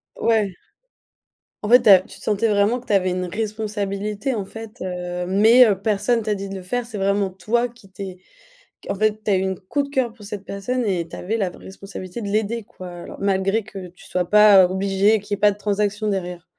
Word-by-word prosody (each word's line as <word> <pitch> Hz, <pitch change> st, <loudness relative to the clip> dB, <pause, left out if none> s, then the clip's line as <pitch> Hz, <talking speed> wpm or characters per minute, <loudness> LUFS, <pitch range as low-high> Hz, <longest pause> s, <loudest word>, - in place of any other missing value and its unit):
Ouais. 210 Hz, -5 st, +1 dB, 1.1 s
En 210 Hz, -, -3 dB
fait, 245 Hz, +2 st, +7 dB
tu -, -, +5 dB
as 190 Hz, -2 st, +9 dB
tu -, -, -14 dB
te -, -, -12 dB
sentais 215 Hz, +2 st, +1 dB
vraiment 210 Hz, +3 st, +2 dB
que 250 Hz, -, -17 dB
tu 210 Hz, -, -1 dB
avais 185 Hz, -2 st, +3 dB
une 180 Hz, 0 st, -2 dB
responsabilité, 210 Hz, +2 st, -3 dB
en 205 Hz, -3 st, -3 dB
fait, 225 Hz, +4 st, -10 dB
heu, 180 Hz, -1 st, -4 dB
mais 220 Hz, +6 st, +6 dB
heu, 200 Hz, -3 st, +1 dB
personne 220 Hz, +3 st, +1 dB
t'a 210 Hz, -1 st, -1 dB
dit 195 Hz, 0 st, -6 dB
de 195 Hz, -, -6 dB
le 190 Hz, -, -6 dB
faire: 245 Hz, +7 st, -3 dB
c'est 230 Hz, -3 st, -7 dB
vraiment 200 Hz, 0 st, +1 dB
toi 215 Hz, +6 st, 0 dB
qui 235 Hz, -4 st, -19 dB
t'es 190 Hz, -1 st, -8 dB, 0.7 s
en -, -, -1 dB
fait, 215 Hz, +1 st, 0 dB
tu 210 Hz, -, 0 dB
as 195 Hz, -, +4 dB
eu 185 Hz, -, +1 dB
une 190 Hz, -1 st, -2 dB
coup 285 Hz, +10 st, -2 dB
de 280 Hz, -, -7 dB
cœur 260 Hz, -5 st, -1 dB
pour 220 Hz, -3 st, -15 dB
cette 200 Hz, -1 st, -7 dB
personne 235 Hz, +6 st, -3 dB
et 175 Hz, -5 st, -1 dB
tu -, -, -9 dB
avais 215 Hz, +5 st, -2 dB
la 200 Hz, -4 st, 0 dB
responsabilité 190 Hz, +2 st, -9 dB
de 205 Hz, -, -4 dB
l'aider, 215 Hz, +2 st, -1 dB
quoi, 185 Hz, -2 st, -11 dB
alors 175 Hz, 0 st, -9 dB
malgré 195 Hz, +2 st, +1 dB
que 195 Hz, -3 st, -9 dB
tu 175 Hz, -, -17 dB
sois 180 Hz, -1 st, -2 dB
pas 210 Hz, -3 st, +7 dB
obligé, 195 Hz, +3 st, +2 dB
qu'il 205 Hz, +1 st, -4 dB
y -, -, -6 dB
ait -, -, -24 dB
pas 210 Hz, -, +6 dB
de 200 Hz, -, -12 dB
transaction 205 Hz, +1 st, -1 dB
derrière. 180 Hz, -3 st, -3 dB
200 Hz, 230 wpm, -22 LUFS, 190-220 Hz, 1.1 s, as